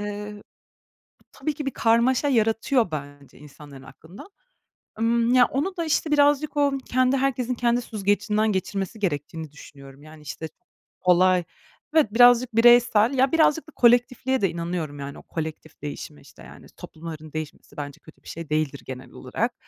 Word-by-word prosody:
Eee, 205 0 -6 0.9
tabii 305 - -4
ki 295 0 -6
bir 275 - -1
karmaşa 235 +5 +2
yaratıyor 225 -2 +1
bence 145 -2 -8
insanların 145 -1 -14
aklında. 165 +8 -14 0.7
Imm, 235 +1 +2
ya 250 -1 +6
onu 345 +9 -3
da 335 - -2
işte 310 0 0
birazcık 290 +1 +2
o 285 -1 +3
kendi, 255 +1 +2
herkesin 255 -2 -1
kendi 240 0 +1
süzgecinden 210 0 0
geçirmesi 195 +2 -3
gerektiğini 160 -4 -4
düşünüyorum. 140 -1 -14
Yani, 155 0 -14
işte, 150 +2 -7 0.5
olay, 180 0 +4 0.5
evet 290 -10 +3
birazcık 245 0 +5
bireysel 240 0 +5
ya 265 0 +2
birazcık 320 -1 +2
da - - -13
kolektifliğe 245 +2 +2
de 195 - +2
inanıyorum, 170 -4 -4
yani, 140 0 -7
o - - -13
kolektif 160 -1 -7
değişime, 140 - -7
işte, - - -17
yani, - - -14
toplumların 155 -1 -10
değişmesi 155 -1 -8
bence 145 -1 -7
kötü 155 - -19
bir - - -17
şey 165 -2 -8
değildir 150 -3 -1
genel 130 +1 -9
olarak. - - -3
210 Hz, 155 wpm, -24 LUFS, 155-250 Hz, 0.9 s, ya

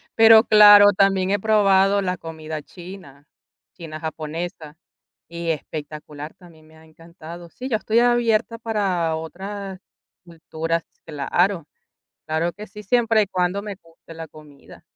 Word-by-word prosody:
Pero 225 0 +7
claro, 205 -2 +7
también 195 -1 +2
he 205 - +1
probado 200 -2 +3
la 180 -2 -2
comida 160 -1 -7
china, 175 -5 -13 0.5
china 155 -3 -9
japonesa. 160 0 -7 0.5
Y 170 0 -6
espectacular, 150 -1 -8
también 160 -4 -19
me 160 - -20
ha 160 - -19
encantado. 170 +1 -13
Sí, 255 +9 -8
yo 225 - +1
estoy 220 +1 +1
abierta 235 -1 +1
para 195 -8 -1
otras 190 +4 -7 0.5
culturas, 165 0 -4 0.2
claro, 165 +3 -1 0.6
claro 160 +2 -1
que 210 +5 -10
sí, 210 - -12
siempre 225 +1 +2
y - - -7
cuando 185 +1 -1
me 205 -1 -7
guste 165 0 -17
la 165 0 -8
comida. 150 -2 -17
175 Hz, 135 wpm, -21 LUFS, 160-205 Hz, 0.6 s, Pero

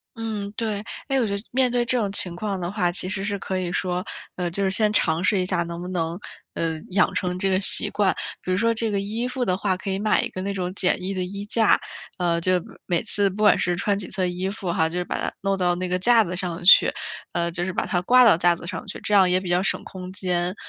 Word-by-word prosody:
嗯， 215 -3 -4
对。 215 -3 -2 0.2
诶， 270 -1 +1
我 240 - +1
觉 200 - -2
得 200 - -8
面 255 -1 +2
对 240 -1 +1
这 250 +1 +2
种 205 -4 -1
情 180 -3 0
况 195 0 -3
的 175 +1 -4
话， 180 -4 0
其 180 +1 +3
实 190 +1 -3
是 200 -1 -2
可 190 0 -3
以 175 -1 -3
说 180 0 -1 0.3
呃， 180 -1 -2
就 200 +4 -2
是 190 - +1
先 210 +1 +2
尝 165 -4 +2
试 200 +1 +2
一 180 - 0
下 180 -2 0
能 170 0 -7
不 180 - -6
能， 170 0 -3 0.4
呃， 160 -1 -2
养 190 0 +2
成 180 -2 -2
这 195 0 +1
个 190 0 +2
习 - - +7
惯。 200 -3 +1 0.3
比 185 - -4
如 185 - +1
说 230 +1 +2
这 225 -1 -1
个 200 - 0
衣 220 +5 -2
服 250 -1 -2
的 185 - +1
话 190 -1 -1
可 190 - -6
以 190 - -1
买 210 0 +2
一 - - -2
个 185 - -6
那 200 +1 -3
种 185 -1 -3
简 185 -2 +1
易 190 +2 -3
的 185 -1 -2
衣 200 +2 -6
架， 220 +1 +3 0.4
呃， 170 -2 0
就 185 +2 +1 0.3
每 175 -2 0
次 205 -2 +2
不 210 +3 -4
管 210 - +6
是 175 -1 0
穿 200 +3 0
几 195 - -5
次 190 -1 -3
地 180 - +1
衣 190 +1 -2
服 195 -4 -4
哈， 160 -1 +1
就 180 +1 -3
把 - - -3
它 - - -2
弄 195 0 0
到 175 -1 +1
那 180 +1 -3
个 180 0 0
架 230 +2 +5
子 180 -1 -5
上 175 -1 -4
去， 190 - +8 0.4
呃， 170 0 -1
就 170 +1 -2
是 185 - -2
把 - - -2
它 175 -4 0
挂 250 +7 +5
到 215 -8 +7
架 175 0 +3
子 170 - -10
上 185 -3 -5
去， - - -7
这 210 - -2
样 190 -3 +5
也 180 +1 +2
比 185 - -8
较 175 +1 +2
省 - - 0
空 185 -1 -9
间。 180 -1 -1
190 Hz, 300 characters per minute, -23 LUFS, 180-205 Hz, 0.4 s, 去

